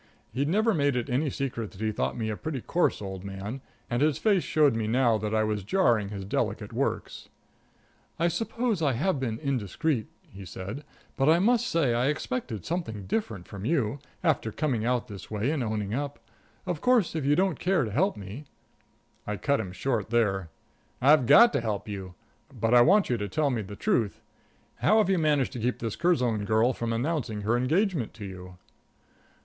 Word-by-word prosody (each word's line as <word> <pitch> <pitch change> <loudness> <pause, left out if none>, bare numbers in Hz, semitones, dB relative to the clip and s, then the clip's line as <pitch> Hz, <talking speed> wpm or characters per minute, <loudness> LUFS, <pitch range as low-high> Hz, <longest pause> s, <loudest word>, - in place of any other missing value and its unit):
He'd 140 +4 0
never 215 +5 +3
made 145 -5 +1
it 125 +1 -2
any 140 +4 +1
secret 120 -6 -3
that 95 - -15
he 110 0 0
thought 105 - -2
me 110 -2 -2
a - - -3
pretty 155 +3 -4
coarse 170 -8 0
old 95 -1 -6
man, 100 +6 -6 0.3
and 120 +2 -1
his 150 -1 +3
face 205 -4 +3
showed 150 -4 +3
me 110 -1 -1
now 120 -1 +3
that 105 +1 -2
I 110 - +3
was 105 -2 -1
jarring 115 - +2
his 100 -2 -6
delicate 100 - -2
works. - - -3 0.9
"I 170 - +2
suppose 225 +3 -1
I 145 -4 +2
have 150 +5 0
been 115 -4 -2
indiscreet," 135 - -1 0.3
he 100 0 -9
said, 95 +9 -7 0.3
"but 135 +2 +2
I 165 - +6
must 230 +5 +2
say 150 -8 +2
I 120 +2 +1
expected 150 - -3
something 160 - -3
different 100 - -3
from 100 -1 -8
you, 135 -2 0 0.2
after 155 -9 +1
coming 125 -4 -1
out 125 0 0
this 100 -5 -9
way 110 +6 -1
and 155 -4 -1
owning 105 -2 -2
up. 140 +3 -3 0.5
Of 175 -5 -3
course, 250 -7 +3
if 160 - -1
you 145 +2 +3
don't 185 -3 +1
care 180 -3 +2
to 110 - -4
help 185 - +1
me 105 +9 -8 0.4
" - - -37
I 105 0 -2
cut 140 +4 +1
him 95 -5 -4
short 110 +2 -2
there. 100 -7 +1 0.5
"I've 140 -1 +5
got 235 - +8
to - - +1
help 110 -3 -3
you. 95 -3 -6 0.4
But 115 +1 0
I 120 - +8
want 195 +5 +4
you 120 - +2
to 105 -2 -4
tell 150 -2 +1
me 120 -3 -1
the 100 0 -8
truth. 105 0 0 0.6
How 130 - +3
have 210 -3 +3
you 185 - +2
managed 150 -4 +2
to 125 - -5
keep 125 +2 0
this 115 -3 -4
Curzon 125 -12 +1
girl 110 +4 +3
from 115 -1 -3
announcing 120 -3 -1
her 110 +3 +1
engagement 155 - 0
to 105 -3 -7
you?" 90 -1 -9
125 Hz, 200 wpm, -27 LUFS, 105-155 Hz, 0.9 s, got